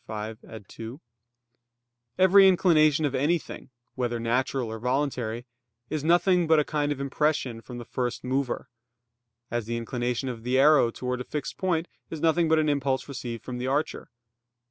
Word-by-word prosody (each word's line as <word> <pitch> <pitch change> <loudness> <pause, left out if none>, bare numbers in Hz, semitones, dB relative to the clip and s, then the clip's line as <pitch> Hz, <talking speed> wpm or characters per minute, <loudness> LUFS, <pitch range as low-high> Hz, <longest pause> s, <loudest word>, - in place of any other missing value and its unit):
5, 110 +1 -5
ad 110 -4 -11
2), 115 +5 -9 1.2
every 190 +1 +7
inclination 155 -5 +4
of 140 - -1
anything, 150 +5 -1 0.2
whether 120 -2 -2
natural 120 +1 -1
or 110 - -6
voluntary, 125 -2 -2 0.5
is 155 -2 -2
nothing 175 +1 +3
but 160 0 +5
a - - +3
kind 145 -1 -1
of 145 - -3
impression 140 -4 -1
from 125 +1 -9
the 120 - -7
first 125 0 -3
mover; 130 0 -2 0.8
as 120 -2 -2
the 115 0 -2
inclination 120 +2 -2
of 120 -3 -5
the 125 +3 0
arrow 145 -3 +5
towards 125 +1 -4
a - - -3
fixed 150 +2 -5
point 175 -3 0 0.2
is 160 - -6
nothing 165 +1 +2
but 160 - +4
an 155 -1 +2
impulse 140 -2 0
received 125 -4 -6
from 125 -1 -5
the 125 - -3
archer. 145 +4 -2
135 Hz, 165 wpm, -26 LUFS, 120-155 Hz, 1.2 s, every